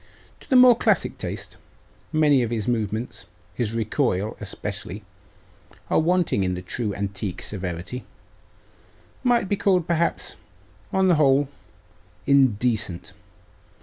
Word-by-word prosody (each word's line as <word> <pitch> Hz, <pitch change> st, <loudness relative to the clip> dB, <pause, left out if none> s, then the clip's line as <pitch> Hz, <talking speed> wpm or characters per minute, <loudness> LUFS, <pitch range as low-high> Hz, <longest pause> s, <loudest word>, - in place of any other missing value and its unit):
To -, -, -18 dB
the 265 Hz, -, +3 dB
more 250 Hz, -1 st, +8 dB
classic -, -, +1 dB
taste, -, -, -6 dB, 0.5 s
many 150 Hz, -4 st, +4 dB
of 120 Hz, -, -1 dB
his 115 Hz, -3 st, -2 dB
movements 110 Hz, 0 st, -2 dB, 0.3 s
his 110 Hz, +2 st, -2 dB
recoil, 110 Hz, -2 st, -1 dB
especially 100 Hz, +4 st, -5 dB, 0.9 s
are -, -, +4 dB
wanting 170 Hz, -, +2 dB
in 90 Hz, -1 st, -1 dB
the 90 Hz, -, -7 dB
true 105 Hz, +3 st, -3 dB
antique 100 Hz, -1 st, -4 dB
severity 95 Hz, +4 st, -4 dB, 1.2 s
might 240 Hz, -5 st, +2 dB
be 205 Hz, -, +1 dB
called, 185 Hz, -4 st, +2 dB
perhaps, 170 Hz, 0 st, -1 dB, 0.5 s
on 190 Hz, 0 st, +2 dB
the 175 Hz, -4 st, +4 dB
whole, 140 Hz, 0 st, +3 dB, 0.8 s
indecent. 120 Hz, -8 st, +2 dB
120 Hz, 115 wpm, -24 LUFS, 100-165 Hz, 1.2 s, more